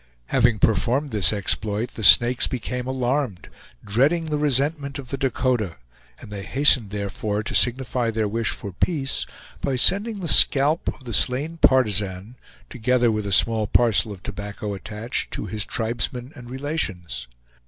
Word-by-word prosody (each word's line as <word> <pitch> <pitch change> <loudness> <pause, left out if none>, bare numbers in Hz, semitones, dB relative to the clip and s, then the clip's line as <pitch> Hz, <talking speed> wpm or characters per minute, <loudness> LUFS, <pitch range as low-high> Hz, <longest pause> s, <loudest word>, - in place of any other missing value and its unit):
Having 120 -3 +2
performed 125 +8 0
this 100 -6 +4
exploit 105 +2 0
the 110 - -8
Snakes 120 +4 +6
became 125 0 -5
alarmed, 130 -5 -3 0.4
dreading 140 +11 +1
the 155 -1 -2
resentment 145 0 -1
of 135 -3 -10
the 135 - -2
Dakota, 125 - -2 0.4
and - - -13
they 100 -1 -6
hastened 130 -1 +3
therefore 105 +1 -4
to - - -5
signify 125 -1 +1
their 110 -1 -2
wish 115 +1 -2
for 100 - -6
peace 135 - -2 0.3
by 135 - -2
sending 205 - +4
the 175 - -5
scalp 145 +2 +4
of - - -5
the 120 -2 -7
slain 140 +10 +1
partisan, 105 - +1 0.3
together 125 0 0
with 105 -1 -3
a - - -4
small 110 +2 +4
parcel 115 0 +2
of 95 -4 -11
tobacco 105 0 -6
attached, 105 +5 -5
to - - -5
his 105 +1 -5
tribesmen 120 +3 -3
and 120 -3 -12
relations. 95 - -4
120 Hz, 155 wpm, -22 LUFS, 105-135 Hz, 0.4 s, Snakes